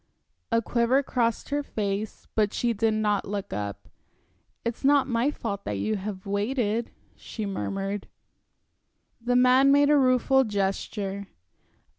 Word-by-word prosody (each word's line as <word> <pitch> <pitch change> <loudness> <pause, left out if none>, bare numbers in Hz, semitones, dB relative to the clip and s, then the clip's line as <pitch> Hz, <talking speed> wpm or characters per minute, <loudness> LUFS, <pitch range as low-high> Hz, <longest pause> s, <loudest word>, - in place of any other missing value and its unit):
A 230 0 +2
quiver 240 +5 +2
crossed 235 -3 -1
her 290 0 0
face, 210 -5 -4
but 210 -1 +1
she 240 -1 +1
did 220 0 +1
not 210 -2 +1
look 200 0 -4
up. 100 -1 -5 0.8
"It's 235 +3 -3
not 280 -1 +5
my 240 +2 +1
fault 205 -8 -4
that 105 - -2
you 215 - -1
have 195 -1 -6
waited," 215 +2 -1 0.3
she 220 - -6
murmured. 195 0 -3 1.2
The 245 +1 +1
man 255 +2 +5
made 285 +1 +5
a 295 - +6
rueful 260 +1 +4
gesture. 200 -1 -2
220 Hz, 135 wpm, -26 LUFS, 200-255 Hz, 1.2 s, a